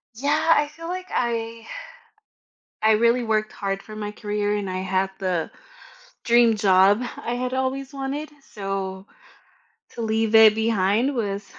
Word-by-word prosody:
Yeah. 305 +6 +2
I 295 0 +1
feel 330 +2 -10
like 370 +1 -4
I 230 -1 -2 1.2
I 220 0 +5
really 235 +2 +3
worked 215 -1 0
hard 195 -1 -3
for 215 0 -11
my 210 -1 -5
career, 210 -1 -2
and 195 -2 -3
I 185 - -3
had 190 0 -1
the 180 -4 -2 0.7
dream 235 -2 +4
job 200 +3 +4 0.2
I 240 - -3
had 250 +1 -3
always 265 +1 -2
wanted. 280 +3 -4 0.2
So, 195 -1 -4 0.8
to - - -9
leave 220 0 0
it 220 -1 +8
behind 220 +4 +1
was 200 -3 -2
220 Hz, 145 wpm, -23 LUFS, 200-250 Hz, 1.2 s, it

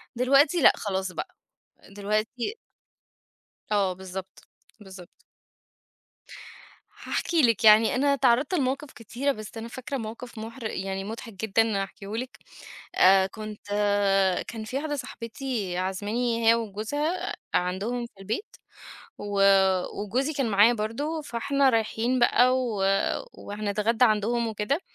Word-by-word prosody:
دلوقتي 275 +7 +4
لأ، - - +7
خلاص 190 -2 -3
بقى. - - -6 0.5
دلوقتي 215 - -2 1.1
آه، 200 -3 +2
بالضبط، 190 0 -8 0.4
بالضبط. 190 -3 -13 1.7
هاحكي 335 -2 -1
لِك 230 -5 +2
يعني 220 +1 +6
أنا 280 +2 +3
اتعرْضت 260 +4 +2
لمواقف 275 -2 -1
كتيرة 245 +5 -2
بس 215 -2 -8
أنا 225 +1 -6
فاكرة 260 +3 -5
موقف 230 +1 -8
محر 230 +3 -8
يعني 195 -2 -3
مضحك 225 +2 -7
جدًا 215 +1 +1
هاحكيهولِك. 215 +6 -7 0.6
آآ، 190 0 +6
كنت 215 +1 -9 0.8
كان 225 -2 -6
في 250 +5 -4
واحدة 295 +1 -2
صاحبتي 230 -6 -4
عازماني 220 +5 -1
هي - - +8
وجوزها 230 - -3 0.2
عندهم 195 +7 -1
في 235 - -14
البيت 220 - -5 0.6
و 205 -1 -1 0.6
وجوزي 255 +9 -1
كان 275 -5 -1
معايا 205 +4 +6
برضو، 245 +9 -3
فإحنا 275 +2 +1
رايحين 230 +2 0
بقى 245 +1 +4
و 230 -6 -2 0.5
وهنتغدى 210 +3 0
عندهم 230 +1 +1
وكده. 220 - -1
225 Hz, 115 wpm, -26 LUFS, 205-255 Hz, 1.7 s, هي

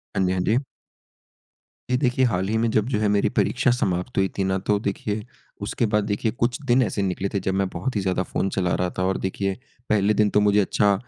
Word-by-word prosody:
हाँ 95 - +2
जी, 90 - +1
हाँ 95 - 0
जी। 110 +6 +2 1.3
ये 125 - +4
देखिए 130 -1 +2
हाल 95 -5 0
ही 110 - +1
में 115 +1 +1
जब 110 0 +2
जो 110 -5 0
है 110 - +2
मेरी 100 -1 +2
परीक्षा 130 - +2
समाप्त 95 -1 -1
हुई 95 0 +3
थी 95 - +1
ना 95 0 +1
तो 105 - +4
देखिए, 105 +1 -3 0.4
उसके 110 +3 -1
बाद 105 -1 +2
देखिए 105 +1 -1
कुछ 120 +5 -1
दिन 125 +1 +4
ऐसे 105 - -2
निकले 95 0 -1
थे 100 - +1
जब 95 0 -2
मैं 95 0 +1
बहुत 130 -3 -3
ही 100 - +1
ज़्यादा 95 -1 0
फ़ोन 95 - -2
चला 90 -2 +1
रहा 90 0 0
था। 90 - 0
और 95 +1 +1
देखिए 95 +1 -2 0.4
पहले 105 0 +3
दिन 105 -1 +3
तो 105 - +3
मुझे 105 0 +4
अच्छा 100 +1 +3
100 Hz, 240 wpm, -24 LUFS, 95-110 Hz, 1.3 s, ये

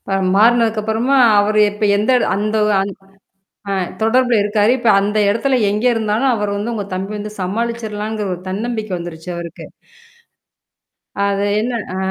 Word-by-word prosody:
இப்ப 195 - -3 0.2
மாறுனதுக்கப்புறமா, 225 +2 +2 0.2
அவரு 215 +1 +1
இப்ப 210 +1 -3
எந்த 210 +4 0
இட - - 0
அந்த 210 +2 -1
ஒ - - +1
அந் 195 +1 -3 0.8
அ - - 0 0.3
தொடர்புல 245 +2 +3
இருக்காரு. 210 +1 +2
இப்ப 235 -2 0
அந்த 205 +2 -1
இடத்துல 260 +5 +1
எங்க 210 +3 -2
இருந்தாலும் 225 +4 0
அவரு 210 -2 -2
வந்து, 220 +4 -3
உங்க 205 -3 -4
தம்பி 190 +2 -4
வந்து 210 0 -6
சமாளிச்சர்லாம்ங்கிற 215 +1 -3
ஒரு 175 - -10
தன்னம்பிக்கை 215 0 -3
வந்துருச்சு 170 0 -8
அவருக்கு. 170 -1 -8 1.6
அது 200 0 0 0.2
என்ன 240 +3 -2 0.2
அ - - -3
215 Hz, 150 wpm, -17 LUFS, 200-230 Hz, 1.6 s, தொடர்புல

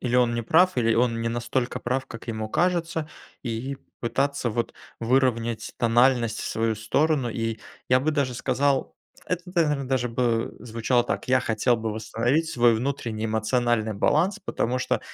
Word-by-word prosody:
или 125 -1 0
он 120 -1 +3
не 115 - -1
прав, 180 +8 +4
или 115 -2 +3
он 115 -1 +1
не 115 - -1
настолько 120 +2 -2
прав, 130 +2 -1
как 115 +1 -10
ему 110 -1 -3
кажется, 170 0 0 0.3
и 125 +3 -3 0.2
пытаться 135 +1 0
вот 115 +2 -2 0.3
выровнять 120 -2 +1
тональность 120 0 +3
в - - -4
свою 115 0 0
сторону, 130 +4 +1
и 115 -1 -2 0.3
я 125 0 +4
бы 155 +4 +1
даже 140 -4 0
сказал 135 +2 0 0.3
это 180 -1 -2
тогда, 180 -2 +1
наверно, 140 -3 -2
даже 130 -2 +1
бы 115 -1 0
звучало 120 +1 0
так: - - -3
"Я 130 0 +4
хотел 120 +1 +1
бы 110 -1 -3
восстановить 120 +8 0
свой 120 -4 +4
внутренний 115 -3 -2
эмоциональный 110 0 +1
баланс, 165 - +2
потому 125 -7 -1
что - - 0
120 Hz, 165 wpm, -25 LUFS, 115-135 Hz, 0.3 s, прав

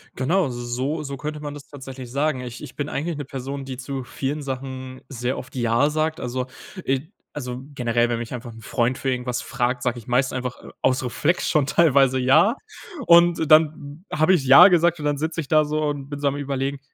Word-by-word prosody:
Genau, 160 +5 +1
so 120 -1 -5
so 130 +6 -2
so 140 -1 -6
könnte 150 +2 -5
man 145 -1 -6
das 145 -1 -11
tatsächlich 135 -3 -9
sagen. 140 0 0
Ich 125 -1 -8
ich - - -10
bin 145 0 -3
eigentlich 160 +2 -3
'ne 145 - -4
Person, 135 +1 -6
die 130 -1 -7
zu 135 +1 -5
vielen 135 +4 -4
Sachen 130 -1 -6
sehr 125 -1 -3
oft 130 - -9
„ja“ 120 +4 +2
sagt. 155 +1 -1
Also, 125 +1 -3 0.4
äh 135 0 0 0.3
also 125 -3 -5
generell, 120 -2 +1
wenn 115 - -1
mich 120 +2 -6
einfach 120 -1 -6
'n 115 0 -13
Freund 120 +3 0
für 135 - -2
irgendwas 125 -1 -2
fragt, 125 0 -2
sage 125 -1 -1
ich 115 - -15
meist 125 +1 +1
einfach, 125 -1 -4
äh, - - -11
aus 130 - +2
Reflex 145 +7 0
schon 150 -4 +3
teilweise 135 -3 +4
„ja“. 140 - +4 0.5
Und 170 -2 +5
dann 155 0 +3
habe 155 +4 +3
ich 145 -7 +1
„ja“ 155 +8 +10
gesagt 175 -2 +3
und 150 - -5
dann 145 -1 +1
sitze 160 +2 -3
ich 150 - -3
da 155 +1 +4
so 150 +1 -1
und 145 -2 -3
bin 145 - -5
so 145 - 0
am 140 - 0
Überlegen: 140 -1 -3
135 Hz, 220 wpm, -23 LUFS, 125-150 Hz, 0.5 s, ja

